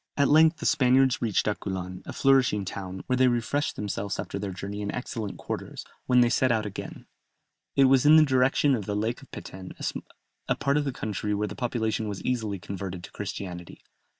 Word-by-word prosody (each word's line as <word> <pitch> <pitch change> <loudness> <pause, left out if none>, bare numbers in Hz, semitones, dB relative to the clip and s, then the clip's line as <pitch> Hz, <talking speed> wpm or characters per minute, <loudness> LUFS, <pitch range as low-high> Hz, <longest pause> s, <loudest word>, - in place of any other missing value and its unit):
At 140 -1 +3
length 160 +2 +6
the - - -7
Spaniards 130 0 +3
reached 110 -5 +1
Aculan, 95 -3 -3
a - - -4
flourishing 130 -7 +3
town, 95 0 -6
where 125 - 0
they 130 0 +5
refreshed 120 +4 0
themselves 100 -1 -3
after 100 - -4
their 100 0 -3
journey 100 +2 -6
in 100 - -2
excellent 115 -4 -5
quarters; - - -6 0.2
when 125 -1 +5
they 120 - +5
set 130 +1 +2
out 110 -2 +1
again, 100 - -7 0.7
it 135 - +5
was 135 -1 +5
in 150 +1 +7
the 155 -1 +7
direction 135 +1 +3
of 110 -7 -2
the 105 - -1
Lake 110 +3 -2
of - - -16
Peten, 95 -1 -9 0.7
a - - +2
part 140 +1 +1
of 150 - 0
the 135 - -1
country 105 -3 -3
where 105 +1 -1
the - - -6
population 110 -3 -1
was 100 -2 -5
easily 110 -5 -1
converted 95 0 -6
to - - -10
Christianity. 90 -3 -7
110 Hz, 200 wpm, -27 LUFS, 100-130 Hz, 0.7 s, in